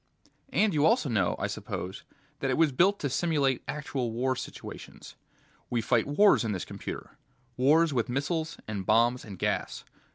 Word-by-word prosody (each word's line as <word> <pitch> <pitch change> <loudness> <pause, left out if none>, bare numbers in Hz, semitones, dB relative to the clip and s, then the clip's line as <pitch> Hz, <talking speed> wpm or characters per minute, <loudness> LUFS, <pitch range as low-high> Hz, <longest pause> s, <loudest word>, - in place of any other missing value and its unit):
"And 215 -5 +2
you 145 -2 +2
also 220 - +3
know, 100 -7 +1
I - - -2
suppose, 95 +1 -5 0.3
that 135 - -1
it 130 - +1
was 160 -2 +4
built 185 +9 +3
to 145 - 0
simulate 140 -2 +1
actual 135 -5 -3
war 130 +3 0
situations. - - -9 0.5
We 120 - 0
fight 115 +1 +1
wars 200 +6 +5
in 110 -2 -1
this 90 - -4
computer... - - -8 0.4
wars 150 +5 +4
with 120 -3 0
missiles 155 +5 -2
and 105 -3 -3
bombs 120 +5 +3
and 100 -4 -9
gas. - - -2
130 Hz, 165 wpm, -28 LUFS, 115-160 Hz, 0.5 s, wars